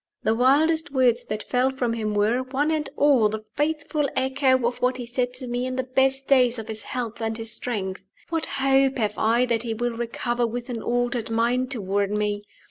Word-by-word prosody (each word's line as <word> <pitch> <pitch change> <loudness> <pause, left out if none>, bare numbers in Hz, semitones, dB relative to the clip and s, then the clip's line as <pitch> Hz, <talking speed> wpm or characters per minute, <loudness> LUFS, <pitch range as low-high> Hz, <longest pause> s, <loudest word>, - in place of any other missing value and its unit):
The 220 - +2
wildest 310 +7 +3
words 250 -3 +2
that 210 0 -4
fell 250 +1 +1
from 255 -3 -1
him 215 -2 -2
were, 215 +4 +2
one 275 +4 -1
and 310 -2 -1
all, 270 -7 +4
the 215 0 -5
faithful 295 -1 0
echo 260 -1 +2
of 240 +1 -2
what 250 +1 +1
he 245 - -5
said 245 +1 -1
to 255 - -4
me 245 +1 -2
in 255 - -3
the 260 - -1
best 270 +1 +1
days 250 -3 +4
of 225 - -6
his 220 -1 -2
health 235 0 -5
and 225 0 -2
his 225 -1 -3
strength. 195 -5 -3 0.3
What 325 -1 -1
hope 270 0 +3
have 210 -3 -1
I 230 +3 +3
that 235 -2 0
he 230 -2 -3
will 240 +2 -1
recover 240 +1 -1
with 240 +2 -5
an 235 -2 -4
altered 240 -1 -1
mind 240 +3 +1
toward 200 -5 -1
me? 205 0 -1
245 Hz, 210 wpm, -24 LUFS, 225-265 Hz, 0.3 s, all